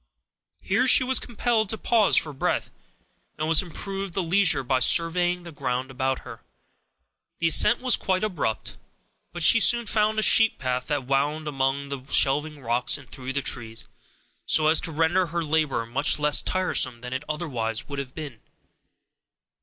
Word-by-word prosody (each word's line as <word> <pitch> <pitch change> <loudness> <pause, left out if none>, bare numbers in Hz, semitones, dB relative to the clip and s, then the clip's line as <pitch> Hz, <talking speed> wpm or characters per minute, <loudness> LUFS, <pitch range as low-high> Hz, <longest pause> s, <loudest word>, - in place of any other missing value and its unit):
Here 240 +7 +1
she 255 - +6
was 260 +1 +2
compelled 230 -3 -1
to 220 - -3
pause 220 -2 +2
for 150 - +1
breath, 135 - -2 0.7
and 155 +2 0
she 160 - +5
improved 195 +2 -6
the 190 - 0
leisure 175 -4 +2
by 130 +1 0
surveying 175 +4 +2
the 170 - -10
ground 130 -2 -4
about 130 0 -2
her. - - -12 1.0
The 165 - 0
ascent 235 +9 +4
was 255 -2 +2
quite 185 +1 -2
abrupt, 155 - -3 0.5
but 175 -1 -1
she 230 - +6
soon 235 +1 +4
found 215 0 +1
a 215 - +2
sheep 225 +1 +4
path 125 -1 -3
that 145 -3 -3
wound 145 +4 -1
among 140 0 -2
the 140 -2 -6
shelving 145 +1 +1
rocks 120 +4 0
and 140 -4 -15
through 130 +1 -8
the 140 0 -3
trees, 115 -2 -2 0.6
so 155 -1 +2
as 160 - +3
to 165 - -4
render 165 +4 +1
her 170 +1 -3
labor 150 -6 -1
much 120 +6 0
less 150 0 +3
tiresome 130 -10 0
than 125 0 -7
it 130 +2 -4
otherwise 130 -6 -4
would 140 -1 -6
have 130 -2 -8
been. 145 -8 -9
155 Hz, 170 wpm, -24 LUFS, 135-185 Hz, 1.0 s, she